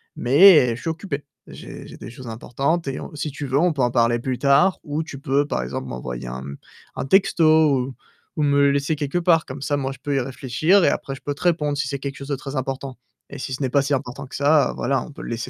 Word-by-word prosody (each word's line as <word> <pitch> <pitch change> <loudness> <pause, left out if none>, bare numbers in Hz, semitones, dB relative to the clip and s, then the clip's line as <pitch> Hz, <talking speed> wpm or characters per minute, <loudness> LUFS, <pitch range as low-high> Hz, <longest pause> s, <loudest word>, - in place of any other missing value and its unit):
mais, 140 -2 +6
je 120 - -10
suis 165 - -3
occupé. 160 -3 -4 0.2
J'ai - - -10
j'ai - - -11
des - - -9
choses 125 +1 -11
importantes 135 +8 -2
et 135 - -3
on - - -9
si 150 +1 -4
tu 145 +1 -6
veux 135 +1 +1
on 175 +1 +3
peut 140 -4 -2
en 120 - +1
parler 120 -1 +2
plus 125 +1 -3
tard, 140 +7 +3
ou 150 +1 -3
tu 140 -4 -9
peux 140 0 +1
par 105 - -2
exemple, 60 - -5
m'envoyer 60 0 -6
un 60 +1 -5
m 70 +1 -8 0.4
un - - -3
texto 175 +1 +3 0.4
ou 135 - -8 0.4
ou 155 - -2
me 140 -1 +2
le 140 0 +5
laisser 140 +3 0
quelque 145 +4 -2
part. 165 -2 +3
Comme 130 +1 -8
ça, 145 +1 -1
moi 135 -1 -2
je 135 - -11
peux 145 -1 -2
y - - +2
réfléchir 135 +9 +1
et - - +5
après 135 - -3
je 135 - -10
peux 145 -1 -4
te - - -10
répondre, 150 -5 +1
si 140 -1 -1
c'est 140 0 -4
quelque 140 0 -5
chose 140 - -8
de 140 - 0
très 135 +1 -7
important. 135 0 -4 0.3
Et 140 - -8
si 130 - -5
ce 130 - -5
n'est 130 - 0
pas 140 +2 +3
si 145 +1 -1
important 135 0 -3
que - - -10
ça, 145 +1 +3
voilà, 135 0 0
on - - -9
peut - - -11
le - - -7
laisser 120 +2 -4
140 Hz, 275 wpm, -22 LUFS, 130-150 Hz, 0.4 s, mais